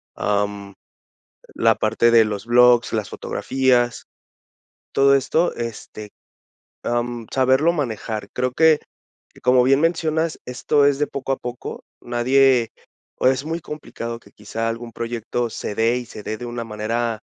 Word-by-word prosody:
am, 100 -1 -2 0.8
la 115 -1 +3
parte 110 +2 +2
de 115 -1 +6
los 105 -1 -4
blogs, 120 0 +5
las 110 -3 -1
fotografías, 125 -3 0 0.9
todo 140 0 +5
esto, 160 +6 +1
este, 110 -2 -7 0.7
am, 120 -1 -2
saberlo 130 +6 +3
manejar, 110 -7 -4
creo 125 0 -1
que 160 +1 +5 0.6
como 125 0 +5
bien 135 +3 +3
mencionas, 165 -1 0
esto 140 +3 +1
es 140 -1 +3
de 150 - +1
poco 135 0 -4
a - - -3
poco, 125 0 -7 0.2
nadie, 125 0 +3 0.5
o - - +2
es 130 +1 +2
muy 165 +2 -3
complicado 115 -7 -7
que, 100 -3 -20
quizá 115 +2 -4
algún 115 +1 -6
proyecto 115 0 -3
se 105 - -5
dé, 115 +3 +2
y 125 - -5
se 105 - -10
dé 110 - -4
de 120 - -7
una 120 0 -4
manera 115 +1 -2
120 Hz, 145 wpm, -21 LUFS, 115-135 Hz, 0.9 s, de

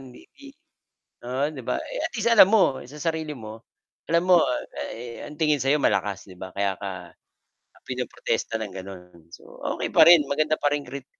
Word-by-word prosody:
Di 130 -2 -14 1.0
Oo, 130 +4 -1
'di 130 - -8
ba? 120 - -2 0.3
Atleast 235 -2 -1
alam 200 -4 +8
mo 195 -11 +3
sa 150 - -11
sarili 160 -1 -2
mo, 110 0 -10 0.5
alam 170 +1 +3
mo 175 -3 +6 0.8
ang 150 - -10
tingin 150 -3 +2
sa 135 - 0
'yo 150 - +4
malakas, 100 -7 0
'di 90 - -13
ba? 95 +1 -8
Kaya 100 -1 -1
ka 100 - -3 1.0
pinoprotesta 115 - -3
ng, 105 -4 -6
gano'n. 90 -3 -11
so, - - -14 0.2
okey - - -3
pa - - +7
rin 165 -4 +8
maganda 155 +2 0
pa 145 0 +1
rin 145 - -2
krit 140 -1 -9
135 Hz, 170 wpm, -25 LUFS, 100-155 Hz, 1.0 s, alam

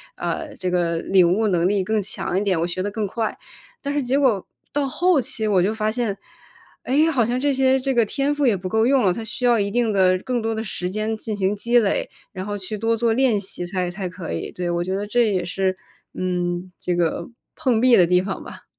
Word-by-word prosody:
啊， - - -3 0.2
这 185 - -1
个 175 -2 0
领 180 0 +3
悟 220 +3 +1
能 175 -3 +2
力 200 0 +1
更 215 +3 0
强 190 -1 -2
一 - - -1
点， 190 -5 +1
我 170 - 0
学 180 +1 -3
得 205 - -2
更 210 0 -2
快。 220 +2 -2 0.5
但 285 - -3
是 290 -1 0
结 260 +3 +1
果 235 -9 +2 0.3
到 285 -1 0
后 350 +4 +2
期 220 -3 -2
我 200 -3 +3
就 205 +4 +1
发 215 -1 -1
现， 230 -3 -1 0.7
诶， 300 +5 +3
好 255 -8 +2
像 245 +3 -1
这 285 +2 +1
些 265 0 +3
这 265 0 -1
个 235 -2 +4
天 275 +6 -1
赋 290 -1 +1
也 235 -5 +4
不 185 0 -5
够 220 +3 +2
用 265 0 +3
了， 190 - +4
它 225 - -5
需 220 +3 -5
要 240 -2 +4
一 200 0 -1
定 235 0 +1
的 185 -2 +3
更 250 +4 -2
多 225 0 -1
的 220 0 -3
时 185 -4 -3
间 215 +3 -2
进 215 -1 -4
行 195 0 0
积 235 +4 +3
累， 210 -4 0 0.2
然 185 0 -6
后 205 0 -3
去 200 +2 -4
多 225 +2 +1
做 230 0 +1
练 245 -3 +2
习 190 -2 -5
才 180 0 -2
才 185 +1 -4
可 180 -1 -6
以， - - -4
对， 180 -1 -3
我 175 0 0
觉 185 +2 -2
得 205 +1 -3
这 230 0 +2
也 185 -2 0
是， 185 +2 -1 0.4
嗯， 180 0 -2
这 180 - -1
个 170 0 0 0.3
碰 240 -4 +1
壁 250 -1 +6
的 180 - +6
地 180 +1 +3
方 190 0 -5
吧。 - - -11
210 Hz, 265 characters per minute, -22 LUFS, 185-240 Hz, 0.7 s, 壁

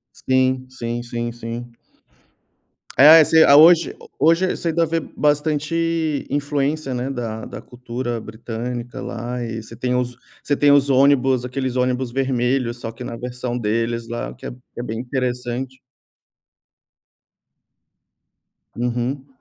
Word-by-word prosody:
Sim, 130 0 +1
sim, 120 -2 -4
sim, 120 0 -4
sim. 120 +1 -7 1.2
É 155 +4 +9
esse 160 +1 +6
a 140 - +7
hoje 165 +2 +6 0.2
hoje 165 +5 +3
você 170 - -2
ainda 165 +1 +2
ver 165 +1 -1 0.2
bastante 155 +1 0
influência, 145 0 -1
né, 125 +2 -3
da 115 -4 -4
da - - -8
cultura 120 -1 -5
britânica 120 +2 -6
lá. 120 +1 -5
E 115 -1 -5
você 115 +1 -11
tem 125 +1 -1
os 125 -1 -1 0.3
você 145 - 0
tem 145 -1 +4
os 145 0 +4
ônibus, 135 -2 +3
aqueles 130 0 -3
ônibus 125 0 0
vermelhos, 125 -1 0
só 115 - -5
que 115 +2 -9
na 115 - -6
versão 125 0 -4
deles 115 +1 -1
lá, 120 0 -5
que - - -11
é - - -4 0.3
é 120 - -4
bem 115 -2 -4
interessante. 125 0 -3 3.0
Uhum. 125 +3 -2
125 Hz, 135 wpm, -21 LUFS, 120-140 Hz, 3.0 s, É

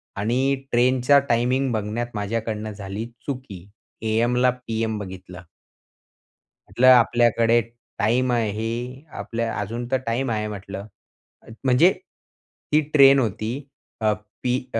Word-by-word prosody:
आणि 125 +7 +1 0.2
ट्रेनचा 125 +3 +4
टायमिंग 125 +3 +1
बघण्यात 110 +2 -2
माझ्याकडनं 110 +1 -3
झाली 100 +1 -6 0.2
चुकी 120 -10 -6 0.4
एएमला 120 +3 +2
पीएम 115 -3 -3
बघितलं. 95 -2 -9 1.3
म्हटलं 130 +2 +2
आपल्याकडे 120 -2 +5 0.4
टाईम 125 +4 +2
आहे. 115 +4 -2
आपल्या 115 0 -3
अजून 115 +4 -4
तर 130 - +3
टाईम 120 +2 -1
आहे 105 -1 -1
म्हटलं. 100 -1 -7 0.8
म्हणजे 135 +8 +5 0.8
ती 150 +1 +5
ट्रेन 140 -2 +7
होती 110 -2 -2 0.5
अ, 110 -1 +3 0.3
पी 125 -1 +1 0.2
अ, 115 - +1
115 Hz, 110 wpm, -23 LUFS, 105-125 Hz, 1.3 s, ट्रेन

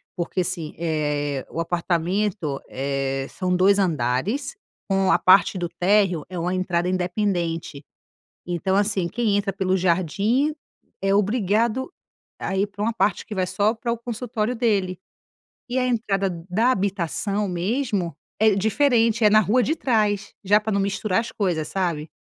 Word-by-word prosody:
Porque, 180 +1 -2
assim, 175 -4 -4
eh, 145 -4 -1
o 165 - -5
apartamento, 175 -1 -1
eh, 135 0 -2
são 180 -1 -1
2 200 +2 +4
andares, 180 - 0 0.3
com 195 -1 +2
a - - +5
parte 190 +1 +5
do 175 -1 -2
térreo 180 -1 +2
é 180 - -6
uma 175 +2 -1
entrada 180 -1 0
independente. 180 -5 -2 0.6
Então, 180 +2 0
assim, 200 -4 +1
quem 220 -1 0
entra 200 -1 0
pelo 190 0 0
jardim 195 - +1 0.5
é 195 0 +2
obrigado 215 - +1 0.5
a 195 - -3
ir 200 +2 +2
pra 205 0 -7
uma 230 +2 +1
parte 205 -2 0
que 210 - -6
vai 185 -1 0
só 210 +5 +1
para 235 +1 -4
o 235 - -3
consultório 235 0 -3
dele. 200 -6 0 0.7
E 255 - -1
a 255 - +1
entrada 200 -5 0 0.2
da 225 +7 +3
habitação 200 0 -1
mesmo 185 - -1 0.2
é 215 -2 +4
diferente, 230 +1 +2
é 210 - +7
na 215 - +6
rua 225 +4 +2
de 310 - +1
trás. 210 -8 0
Já 205 +2 +4
pra 215 0 -3
não 200 - +1
misturar 200 +1 0
as 230 - -7
coisas, 175 -7 -1
sabe. 170 -5 -2
195 Hz, 155 wpm, -23 LUFS, 175-215 Hz, 0.7 s, é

